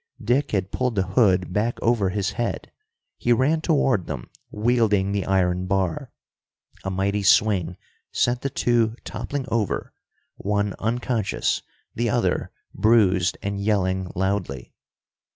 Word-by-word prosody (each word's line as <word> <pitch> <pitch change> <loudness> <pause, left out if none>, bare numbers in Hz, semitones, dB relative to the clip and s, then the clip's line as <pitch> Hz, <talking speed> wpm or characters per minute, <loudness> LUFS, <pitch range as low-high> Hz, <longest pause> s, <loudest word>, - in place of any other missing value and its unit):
Dick 135 +4 +1
had 95 -2 -1
pulled 125 -3 -1
the 95 - +2
hood 95 -2 +2
back 110 +4 0
over 115 -5 +2
his 100 +1 -1
head. 120 +3 -3 0.5
He 120 - +1
ran 140 +7 +3
toward 135 - +1
them, 65 -6 -6 0.2
wielding 105 -3 +2
the 100 -1 -2
iron 90 -1 +1
bar. 95 -3 -1 0.7
A 95 - -2
mighty 100 +2 0
swing 90 -1 +3 0.3
sent 120 0 +1
the 140 - -1
two 120 -3 +1
toppling 140 -2 -4
over, 115 -4 -1 0.4
one 100 0 -1
unconscious, 115 -2 -1 0.3
the - - -1
other - - 0 0.2
bruised 95 -4 +3
and 100 0 -2
yelling 95 -3 0
loudly. 95 -9 -2
100 Hz, 130 wpm, -24 LUFS, 95-120 Hz, 0.7 s, ran